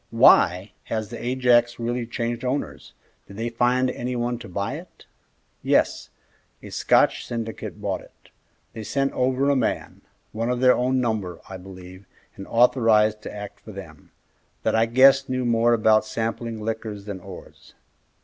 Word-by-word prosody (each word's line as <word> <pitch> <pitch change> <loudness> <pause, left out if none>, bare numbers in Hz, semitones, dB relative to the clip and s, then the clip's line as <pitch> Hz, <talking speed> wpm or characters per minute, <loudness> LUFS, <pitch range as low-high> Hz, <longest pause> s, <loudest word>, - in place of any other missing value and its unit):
"Why, 90 +3 +5
has 110 -2 -3
the 120 - -7
Ajax 120 -1 +2
really 120 0 -3
changed 120 0 -3
owners? 130 +3 -4 0.3
Did 100 - -12
they 115 +2 -2
find 125 +2 +1
any 125 0 -4
one 120 0 -2
to 115 - -10
buy 100 +2 -3
it?" - - -14 0.6
"Yes, - - +1 0.5
a - - -10
Scotch - - +2
syndicate 115 -2 -5
bought - - -3
it. - - -21 0.4
They 110 -1 -7
sent 135 +5 -1
over 130 +2 +1
a - - +2
man 130 - -2 0.3
one 115 +2 -2
of 125 0 -1
their 125 0 +6
own 130 +1 +1
number, 105 -8 -2
I 95 - -7
believe, 95 0 -12 0.3
and 95 - -9
authorized 115 -3 +3
to - - -7
act 105 -1 -8
for - - -12
them - - -11 0.5
that - - +1
I 115 +1 +3
guess 135 +3 +5
knew 130 -1 -1
more 120 0 +3
about 110 -1 +4
sampling 115 +1 -4
liquors 110 -2 -5
than 100 -2 -6
ores. 95 0 -13
115 Hz, 160 wpm, -24 LUFS, 105-125 Hz, 0.6 s, their